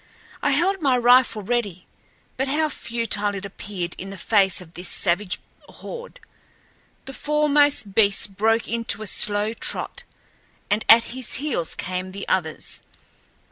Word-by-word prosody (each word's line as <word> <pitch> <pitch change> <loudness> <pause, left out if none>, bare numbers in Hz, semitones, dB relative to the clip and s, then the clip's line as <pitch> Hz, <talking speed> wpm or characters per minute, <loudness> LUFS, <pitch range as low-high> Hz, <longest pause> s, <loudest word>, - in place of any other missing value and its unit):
I - - +1
held 365 +6 +1
my 265 -4 +3
rifle 245 -3 +4
ready, 200 -5 -2 0.5
but 265 +2 -1
how 305 +3 +1
futile 230 -5 -1
it 195 +1 -6
appeared 190 -3 -5
in 190 - -6
the 195 - -8
face 195 -1 +3
of 175 -2 -12
this 175 +1 -6
savage 180 +1 0 0.3
horde. 485 0 -9 0.9
The 270 - -8
foremost 290 -7 +2
beast 200 -1 +2
broke 225 +3 +1
into 230 -1 -1
a - - -6
slow 210 +2 +1
trot, 480 - -3 0.7
and 210 +1 +2
at 230 +1 +9
his 255 -3 -4
heels 265 - -2
came 185 +1 -4
the 200 - -7
others. 160 -5 -1
215 Hz, 140 wpm, -23 LUFS, 195-260 Hz, 0.9 s, at